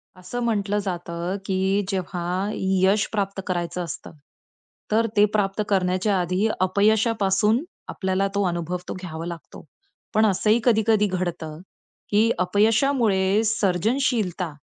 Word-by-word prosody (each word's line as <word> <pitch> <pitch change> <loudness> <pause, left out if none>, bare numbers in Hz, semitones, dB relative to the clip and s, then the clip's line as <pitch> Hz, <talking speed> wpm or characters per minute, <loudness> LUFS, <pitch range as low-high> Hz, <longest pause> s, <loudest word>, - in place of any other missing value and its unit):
अस 185 +2 -14
म्हटलं 210 -4 0
जातं, 175 -1 -4
की 190 +1 +1
जेव्हा 180 -2 -3 0.3
यश 190 +2 +2
प्राप्त 200 -2 -2
करायचं 175 -1 -2
असतं, 165 - -7 0.8
तर 225 +2 +3
ते 205 - +7
प्राप्त 200 0 0
करण्याच्या 185 +1 +1
आधी 185 +4 0
अपयशापासून 210 - +2 0.3
आपल्याला 190 0 -1
तो 200 - +2
अनुभव 175 0 -2
तो - - -2
घ्यावा 165 -2 -6
लागतो. 170 -2 -9 0.5
पण 215 +1 +4
असंही 215 +3 +2
कधी-कधी 220 -3 +3
घडतं, 175 -4 -4 0.5
की 215 +2 +3
अपयशामुळे 210 0 +2
सर्जनशीलता 210 - 0
195 Hz, 115 wpm, -23 LUFS, 180-215 Hz, 0.8 s, ते